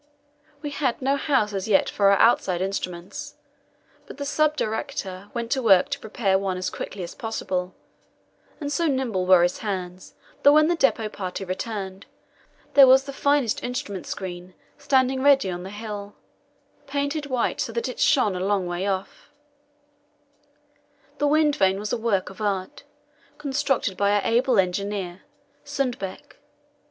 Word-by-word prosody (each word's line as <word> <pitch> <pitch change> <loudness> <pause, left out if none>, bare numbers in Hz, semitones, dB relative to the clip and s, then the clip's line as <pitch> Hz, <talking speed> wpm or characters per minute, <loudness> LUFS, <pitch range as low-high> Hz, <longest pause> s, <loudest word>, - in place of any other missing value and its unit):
We 295 - -3
had 280 -4 -1
no 270 +1 +1
house 265 -8 +1
as 195 0 -3
yet 195 -3 +3
for 200 -1 +3
our 200 - +5
outside 190 -6 +3
instruments, 195 +8 -4 0.7
but - - -10
the 285 - -4
sub 305 +1 +1
director 205 -6 -4
went 235 0 -3
to 265 - +1
work 195 -6 +5
to - - -3
prepare 200 -3 0
one 190 -2 -2
as 185 - -3
quickly 190 -2 -6
as 170 - -7
possible, 185 -5 -3 0.8
and 290 -2 -4
so 335 +3 +1
nimble 245 -10 -1
were 185 -2 +7
his 175 - 0
hands 185 -3 -5 0.3
that 285 - +7
when 305 +1 +5
the 345 - +2
depot 255 -8 +2
party 195 -2 -5
returned 190 0 -5 0.7
there 275 -2 +9
was 265 +1 +6
the 275 - -8
finest 280 -5 +1
instrument 205 -7 -4
screen 180 -1 -6 0.2
standing 265 -2 +2
ready 270 -7 +4
on 175 0 -5
the 185 - -7
hill, 205 -1 -7 0.7
painted 285 +1 -2
white 255 -3 -1
so - - -2
that 235 +2 -2
it 255 - -6
shone 255 -9 +3
a - - -3
long 195 -1 +1
way 175 +2 -3
off: 190 -1 -4 1.9
The 290 - +2
wind 300 0 +3
vane 190 -1 +2
was 210 +1 -4
a - - +1
work 215 -5 0
of 195 - -12
art, 195 -3 -3 0.5
constructed 270 -8 -1
by 200 0 +2
our 205 - +3
able 245 +1 +2
engineer, 190 0 -1 0.4
Sundbeck. 245 -9 -4
210 Hz, 160 wpm, -24 LUFS, 190-270 Hz, 1.9 s, there